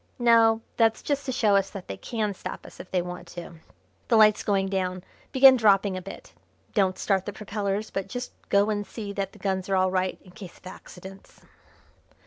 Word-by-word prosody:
No, 230 -2 +4 0.2
that's 225 -1 +2
just 285 -1 -2
to - - 0
show 215 -5 +2
us 195 -1 +2
that 195 -3 -9
they - - -5
can 215 -4 -3
stop - - -8
us - - -14
if - - -10
they 180 -2 0
want 180 0 -8
to. 170 -1 -8 0.5
The 230 - +3
light's 215 -1 +6
going 195 -2 0
down. 185 -2 -2 0.3
Begin 265 0 +8
dropping 200 -4 +3
a 185 - -4
bit. 195 - -11 0.4
Don't 190 -3 +1
start 190 -2 0
the - - -2
propellers, 205 0 -3
but 195 -1 -3
just 245 +4 -6 0.2
go 200 +2 +3
and 205 -1 -1
see 205 -1 -7
that 195 -1 -3
the - - -15
guns 190 -1 -2
are 195 - +2
all 185 0 +2
right 185 0 -1
in 185 - -16
case 180 -1 -11
of - - -24
accidents." 190 +1 -12
200 Hz, 205 wpm, -26 LUFS, 185-220 Hz, 0.5 s, Begin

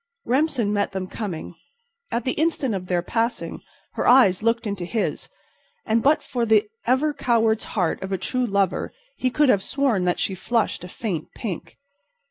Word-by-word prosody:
Remsen 260 -5 +1
met 205 -1 0
them 190 -1 -2
coming. 185 -4 -5 0.6
At 235 0 -2
the 260 - +1
instant 300 -6 0
of 185 -2 -4
their 175 -1 0
passing 230 +5 -2 0.3
her - - -1
eyes 235 -8 +6
looked 230 +1 +1
into 200 -4 -3
his, 210 +5 -2 0.6
and 225 0 +2
but 290 +5 +3
for 245 -2 -2
the 220 -2 +4 0.2
ever 275 +5 +2
coward's 225 -4 +1
heart 180 -4 +1
of 190 - -5
a 190 - +1
true 250 +6 -1
lover 200 -2 0 0.3
he 255 - +1
could 295 +2 +3
have 200 - +4
sworn 240 -5 +1
that 180 - +1
she 195 - -1
flushed 230 +3 -1
a - - -6
faint 180 -4 -4
pink. 195 -8 -6
220 Hz, 175 wpm, -23 LUFS, 190-250 Hz, 0.6 s, eyes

